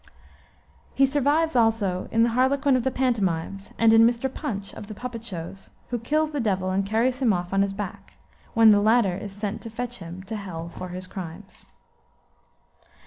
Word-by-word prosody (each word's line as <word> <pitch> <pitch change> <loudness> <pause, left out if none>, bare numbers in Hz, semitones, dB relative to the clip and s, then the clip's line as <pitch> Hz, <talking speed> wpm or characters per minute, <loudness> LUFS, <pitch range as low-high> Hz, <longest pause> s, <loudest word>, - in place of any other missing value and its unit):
'" - - -34 0.3
He 275 - +5
survives 290 +3 +1
also 225 -6 +2
in 225 0 +4
the 235 - +3
harlequin 265 +3 +2
of 255 - +1
the 265 - +2
pantomimes, 200 -7 -1
and 225 -1 +5
in 225 - +7
Mr. 240 +3 +2
Punch, 200 -9 -5
of 205 - -9
the 215 - -8
puppet 240 0 -6
shows, 190 -2 -7 0.2
who 240 - -1
kills 305 +6 0
the 295 - -2
Devil 190 -5 0
and 195 +1 +1
carries 230 +6 +1
him 250 -5 +3
off 180 -1 -2
on 195 - +3
his 200 0 +1
back, 195 -1 -7 0.4
when 225 -1 +8
the 205 -1 +5
latter 215 -3 +3
is 200 +1 -6
sent 205 +1 -4
to 230 - -7
fetch 245 +2 -5
him 175 +1 -8
to 215 +3 -5
hell 170 -5 -6
for 185 - -6
his 180 +1 -5
crimes. 185 +1 -9
220 Hz, 195 wpm, -25 LUFS, 195-245 Hz, 0.4 s, when